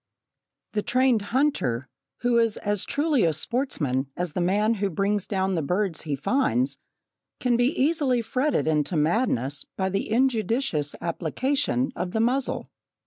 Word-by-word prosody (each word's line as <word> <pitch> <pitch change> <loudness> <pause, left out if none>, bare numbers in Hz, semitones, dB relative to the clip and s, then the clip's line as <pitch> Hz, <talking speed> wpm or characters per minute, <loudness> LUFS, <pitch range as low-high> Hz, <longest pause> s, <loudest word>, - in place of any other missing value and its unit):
The 210 - 0
trained 250 0 +2
hunter, 245 - +1 0.4
who 240 -1 +3
is 230 -2 +2
as 205 -1 -1
truly 290 -4 +1
a 165 - +3
sportsman 150 - -1
as 175 -3 -2
the 180 - -1
man 205 +5 +2
who 200 - +1
brings 200 +3 0
down 190 -1 0
the 165 - 0
birds 180 +2 -1
he 150 -3 -2
finds, 135 - 0 0.6
can 250 -1 +2
be 245 +5 +1
easily 270 -4 +2
fretted 255 +5 0
into 155 +2 +1
madness 150 - +1
by 190 0 0
the 195 +2 -2
injudicious 225 - +1
application 170 - 0
of 180 0 -4
the 220 - 0
muzzle. 250 +4 0
210 Hz, 145 wpm, -25 LUFS, 160-250 Hz, 0.6 s, who